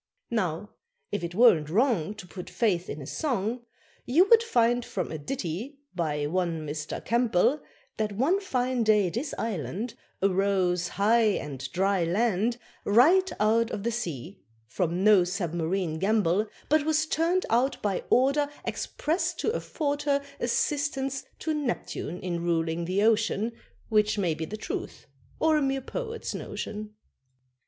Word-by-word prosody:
Now, 195 -3 -1 0.4
if - - -2
it 170 +1 -4
weren't 195 -10 +5
wrong 215 - +1
To 200 - -10
put 180 0 -9
faith 185 -7 0
in 145 - -5
a - - -8
song, 245 - -2 0.4
You 335 +10 +4
would 460 -1 +9
find 245 - +2
from - - -4
a 160 - -4
ditty, 205 - -4 0.2
by 150 -5 -1
one 165 -1 -1
Mr. 150 0 -5
Campbell, 235 +3 +2 0.4
That 215 -1 -1
one 285 - +2
fine 255 -9 -1
day 210 -5 +3
this 270 - -3
island 220 - -3 0.3
Arose, 190 -2 +2
high 215 +1 +3
and 135 -2 -6
dry 190 0 +1
land, 215 +5 +1 0.3
Right 330 - +5
out 225 +2 +3
of 200 - -4
the 235 - 0
sea 175 - -5 0.3
from 175 +9 -1
no 210 -3 +7
submarine 175 -2 -2
gambol; 205 0 +2 0.2
But 305 0 +3
was 310 0 +2
turned 335 +4 +1
out 255 +4 +2
by 200 -3 0
order, 280 +3 +3 0.2
Express 320 +5 -1
to 440 - 0
afford 290 -10 -2
her 280 -1 +1 0.2
Assistance 270 +1 -1
to 315 - -2
Neptune 245 - -3
in 175 -2 -2
ruling 165 0 0
the 190 +4 +1
ocean, 225 0 +2 0.4
Which 210 -1 +3
may 180 -5 +1
be 160 +1 -4
the 215 +7 -6
truth, - - -5 0.3
or 315 -1 +4
a - - +1
mere 270 -1 +1
poet's 455 - -5
notion. 210 0 -6
215 Hz, 145 wpm, -27 LUFS, 180-260 Hz, 0.4 s, would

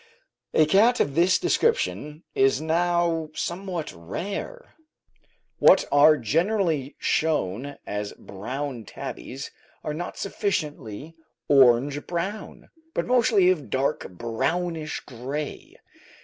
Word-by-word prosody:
A 155 - +6
cat 215 +9 +4
of 140 - +1
this 175 +4 +4
description 360 - 0
is 135 0 +3
now 165 0 +1
somewhat 175 -2 -4
rare. 195 - -6 0.9
What - - +6
are 150 +2 +6
generally 160 - 0
shown 140 -3 -1
as 105 0 -4
brown 125 +4 -6
tabbies 135 +6 -7 0.3
are 150 - -3
not 175 +4 -5
sufficiently 155 - -3 0.3
orange 135 +1 +4
brown, 190 +5 -5 0.3
but - - 0
mostly 225 -7 +4
of 185 - +1
a - - -10
dark, 135 +2 -1
brownish 155 - -2
gray. 135 +4 -6
155 Hz, 105 wpm, -25 LUFS, 135-180 Hz, 0.9 s, A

